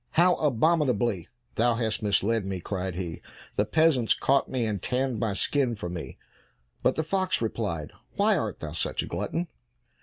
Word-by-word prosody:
"How 180 Hz, +2 st, +5 dB
abominably 125 Hz, -, +2 dB, 0.3 s
thou 120 Hz, +1 st, +2 dB
hast 115 Hz, -2 st, 0 dB
misled 105 Hz, +1 st, +2 dB
me!" 95 Hz, -1 st, -3 dB
cried 95 Hz, 0 st, -3 dB
he, 85 Hz, -3 st, -5 dB, 0.3 s
"the 105 Hz, -, +2 dB
peasants 155 Hz, -5 st, +3 dB
caught 135 Hz, +1 st, +2 dB
me, 125 Hz, -3 st, 0 dB
and 105 Hz, -4 st, -2 dB
tanned 125 Hz, -2 st, -1 dB
my 110 Hz, -2 st, 0 dB
skin 130 Hz, +3 st, +1 dB
for 100 Hz, -5 st, -5 dB
me." 85 Hz, -2 st, -6 dB, 0.6 s
But 130 Hz, -, +2 dB
the 160 Hz, -, 0 dB
fox 185 Hz, +3 st, +1 dB
replied, 100 Hz, -9 st, -2 dB, 0.2 s
"Why -, -, +4 dB
art -, -, -2 dB
thou -, -, -5 dB
such -, -, -1 dB
a -, -, -4 dB
glutton?" 170 Hz, +1 st, -2 dB
115 Hz, 170 wpm, -27 LUFS, 100-140 Hz, 0.6 s, How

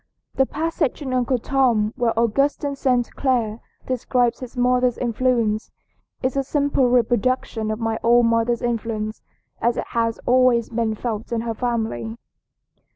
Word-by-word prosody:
"The 265 Hz, -, +2 dB
passage 315 Hz, -1 st, -2 dB
in 260 Hz, -2 st, -3 dB
'Uncle 250 Hz, 0 st, +1 dB
Tom' 240 Hz, -4 st, +1 dB
where 240 Hz, -3 st, 0 dB
Augustine 275 Hz, +5 st, +1 dB
St. 250 Hz, -3 st, 0 dB
Clare 235 Hz, -5 st, 0 dB, 0.3 s
describes 250 Hz, -1 st, 0 dB
his 255 Hz, 0 st, -9 dB
mother's 250 Hz, 0 st, +2 dB
influence 235 Hz, -3 st, 0 dB, 0.5 s
is 260 Hz, 0 st, 0 dB
a 275 Hz, -, +1 dB
simple 280 Hz, -2 st, +1 dB
reproduction 240 Hz, -2 st, +1 dB
of 215 Hz, -, -1 dB
my 225 Hz, -1 st, -1 dB
own 240 Hz, +1 st, +5 dB
mother's 230 Hz, +1 st, +1 dB
influence 225 Hz, -2 st, -2 dB, 0.4 s
as 235 Hz, +1 st, +1 dB
it -, -, -2 dB
has 230 Hz, -1 st, 0 dB
always 250 Hz, -2 st, +3 dB
been 230 Hz, -2 st, -1 dB
felt 220 Hz, 0 st, -4 dB
in 230 Hz, -1 st, 0 dB
her 230 Hz, 0 st, -3 dB
family." 220 Hz, -, -2 dB
240 Hz, 145 wpm, -22 LUFS, 225-255 Hz, 0.5 s, own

